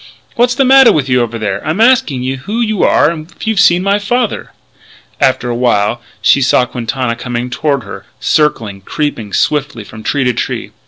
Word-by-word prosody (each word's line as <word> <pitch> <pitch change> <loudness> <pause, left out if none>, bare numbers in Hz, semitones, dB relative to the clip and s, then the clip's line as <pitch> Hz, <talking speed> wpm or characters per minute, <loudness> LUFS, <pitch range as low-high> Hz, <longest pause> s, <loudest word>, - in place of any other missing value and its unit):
"What's 245 +1 +2
the 270 - +2
matter 265 -1 +7
with 140 -3 0
you 125 -1 +3
over 115 -1 -3
there? 105 -3 -3
I'm 155 +6 -2
asking 230 - +2
you 130 +1 -3
who 205 - -5
you 215 -4 -1
are 150 - +3
and 160 +1 -8
if - - -10
you've 220 -2 0
seen 180 -2 +4
my 200 +1 +1
father?" 240 +3 -2 0.7
After 130 -2 +1
a 120 - -2
while 120 -2 0 0.2
she 140 - +4
saw 130 -1 +3
Quintana 125 0 -3
coming 120 +1 -5
toward 140 -1 -1
her, 100 - -10
circling, 115 -10 0
creeping 115 -2 -4
swiftly 140 -4 -1
from 110 +1 -12
tree 140 +5 -1
to 125 -1 +1
tree. - - -4
135 Hz, 195 wpm, -13 LUFS, 120-195 Hz, 0.7 s, matter